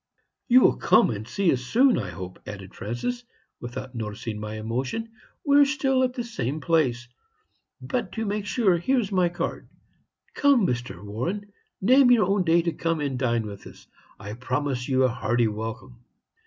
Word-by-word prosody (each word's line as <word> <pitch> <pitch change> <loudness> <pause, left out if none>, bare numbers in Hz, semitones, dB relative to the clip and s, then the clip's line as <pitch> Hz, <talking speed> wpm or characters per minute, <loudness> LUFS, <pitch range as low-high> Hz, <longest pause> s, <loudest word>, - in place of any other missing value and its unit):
"'You 255 +1 +7
will - - +4
come 225 - +4
and 110 0 -6
see 195 +3 +1
us 125 - -2
soon, 245 - +3
I 100 -6 -4
hope,' 90 +2 -8
added 100 -2 -8
Francis, 180 - -4 0.4
without 125 +1 -7
noticing 105 -1 -5
my 105 0 -5
emotion. 125 - -3 0.3
'We 285 -1 +5
are - - +7
still 270 -2 +1
at 255 -1 0
the 240 - -2
same 150 - -3
place; 135 -7 +1 0.7
but 250 -3 -3
to 225 -1 -3
make 205 0 -3
sure, 205 -6 +2
here 260 +9 +2
is 210 -4 -3
my 180 -2 +2
card. 175 - -4 0.6
Come, 280 -7 +4
Mr. 120 - -3
Warren 175 - -4 0.3
name 255 +6 +6
your 235 -5 +5
own 195 0 +1
day 170 0 +3
to 170 - 0
come 165 +1 -1
and 140 -4 -2
dine 120 -3 0
with 100 -2 -9
us. - - -15 0.3
I 100 +2 -7
promise 130 +2 -2
you 130 0 +3
a - - +5
hearty 120 -1 0
welcome.' 115 +3 -6
145 Hz, 180 wpm, -25 LUFS, -, 0.7 s, You